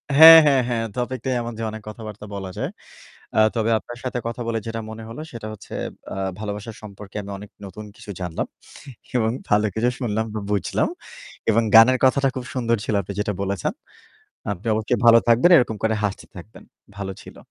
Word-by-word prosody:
হ্যাঁ, 165 Hz, +2 st, +12 dB
হ্যাঁ, 135 Hz, -3 st, +4 dB
হ্যাঁ। 115 Hz, -2 st, 0 dB
টপিক 125 Hz, +1 st, -2 dB
টাই 130 Hz, -, +1 dB
এমন 120 Hz, 0 st, -5 dB, 0.2 s
অনেক 110 Hz, 0 st, -8 dB
কথাবার্তা 105 Hz, -2 st, -9 dB
বলা 95 Hz, -1 st, -5 dB
যায়। -, -, -2 dB, 0.7 s
আ -, -, +3 dB, 0.2 s
তবে 115 Hz, 0 st, 0 dB
আপনার 120 Hz, +2 st, -10 dB
সাথে 125 Hz, -1 st, -2 dB
কথা 115 Hz, +1 st, -4 dB
বলে 115 Hz, -1 st, -1 dB
যেটা 115 Hz, 0 st, -4 dB
মনে 110 Hz, 0 st, -8 dB
হলো 115 Hz, +7 st, -8 dB
সেটা 115 Hz, -2 st, -7 dB
হচ্ছে 105 Hz, -, -13 dB, 0.4 s
আ -, -, -4 dB, 0.2 s
ভালোবাসা 105 Hz, +1 st, -5 dB
সম্পর্কে 100 Hz, -1 st, -11 dB
আমি 100 Hz, -, -9 dB
অনেক 105 Hz, +1 st, -11 dB
নতুন 100 Hz, +3 st, -9 dB
কিছু -, -, -11 dB
জানলাম। 90 Hz, -2 st, -3 dB, 0.7 s
এবং 110 Hz, -2 st, +2 dB, 0.2 s
ভালো 105 Hz, +1 st, +3 dB
কিছু 115 Hz, +2 st, +1 dB
শুনলাম, 110 Hz, -3 st, -1 dB, 0.3 s
বুঝলাম। 100 Hz, -3 st, 0 dB, 0.6 s
এবং 115 Hz, +1 st, +3 dB
গানের 125 Hz, +3 st, +8 dB
কথাটা 135 Hz, +1 st, +4 dB
খুব 130 Hz, -, -5 dB
সুন্দর 115 Hz, -2 st, +1 dB
ছিল 110 Hz, -, -1 dB
আপনি 100 Hz, -, -7 dB
যেটা 105 Hz, 0 st, -1 dB
বলেছেন। 100 Hz, -2 st, -2 dB, 0.8 s
আপনি 100 Hz, +4 st, -9 dB
অবশ্যই 110 Hz, +3 st, 0 dB
ভালো 115 Hz, 0 st, +9 dB
থাকবেন, 120 Hz, +9 st, +5 dB
এরকম 115 Hz, -5 st, +2 dB
করে 110 Hz, 0 st, +2 dB
হাসতে 100 Hz, -1 st, -2 dB
থাকবেন। 100 Hz, +5 st, -12 dB, 0.3 s
ভালো 95 Hz, -1 st, -4 dB
ছিল। -, -, -13 dB
110 Hz, 180 wpm, -22 LUFS, 105-120 Hz, 0.8 s, হ্যাঁ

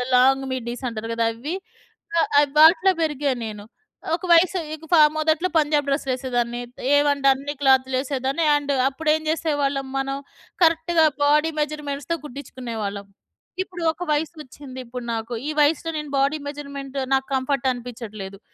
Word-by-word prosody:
Long 270 Hz, +2 st, +4 dB
middies 245 Hz, 0 st, -4 dB
అంటారు 225 Hz, 0 st, -6 dB
గదా! 230 Hz, 0 st, +1 dB
అవి. 280 Hz, +10 st, -5 dB, 0.6 s
ఆహ్, 325 Hz, -, +2 dB
ఆహ్, 290 Hz, -1 st, +3 dB
వాటిలో 335 Hz, +5 st, +7 dB
పెరిగా 295 Hz, -2 st, 0 dB
నేను. 210 Hz, -2 st, -7 dB, 0.5 s
ఒక 335 Hz, -, -2 dB
వయసు 350 Hz, +2 st, +5 dB
ఇక 315 Hz, +1 st, -9 dB
ఫ -, -, +6 dB, 0.2 s
మొదట్లో 315 Hz, +3 st, +1 dB
పంజాబ్ 295 Hz, -2 st, +2 dB
డ్రెస్సు 275 Hz, 0 st, -1 dB
వెసేదాన్ని. 245 Hz, -2 st, -2 dB
త్ -, -, -19 dB, 0.2 s
ఏవంటె 285 Hz, -1 st, +3 dB
అన్ని 275 Hz, +2 st, -2 dB
క్లాతులు 265 Hz, -1 st, +3 dB
ఎసేదాన్ని 275 Hz, +3 st, -1 dB
అండ్ 290 Hz, -1 st, -1 dB, 0.2 s
అప్పుడు 305 Hz, +3 st, -2 dB
ఏం 315 Hz, -, -3 dB
చేసేవాళ్ళం 285 Hz, -4 st, 0 dB
మనం 270 Hz, 0 st, -1 dB, 0.5 s
కరెక్ట్‌గా 330 Hz, 0 st, +4 dB, 0.2 s
బాడీ 300 Hz, +2 st, +4 dB
మెజర్‌మెంట్స్‌తో 295 Hz, +1 st, -3 dB
కుట్టించుకునేవాళ్ళం. 235 Hz, -7 st, -6 dB, 0.6 s
ఇప్పుడు 360 Hz, -2 st, -10 dB
ఒక 345 Hz, -, -6 dB
వయసు 300 Hz, +2 st, -1 dB
వచ్చింది 260 Hz, -2 st, -11 dB
ఇప్పుడు 245 Hz, +1 st, -7 dB
నాకు. 225 Hz, +1 st, -4 dB
ఈ -, -, -1 dB
వయసులో 315 Hz, +2 st, +2 dB
నేను 300 Hz, -2 st, -7 dB
బాడీ 280 Hz, +3 st, +2 dB
మెజర్‌మెంట్ 280 Hz, -1 st, -7 dB, 0.2 s
నాకు 265 Hz, 0 st, +1 dB
కంఫర్ట్ 265 Hz, 0 st, 0 dB
అనిపించట్లేదు. 220 Hz, -5 st, -8 dB
280 Hz, 150 wpm, -23 LUFS, 255-305 Hz, 0.6 s, వాటిలో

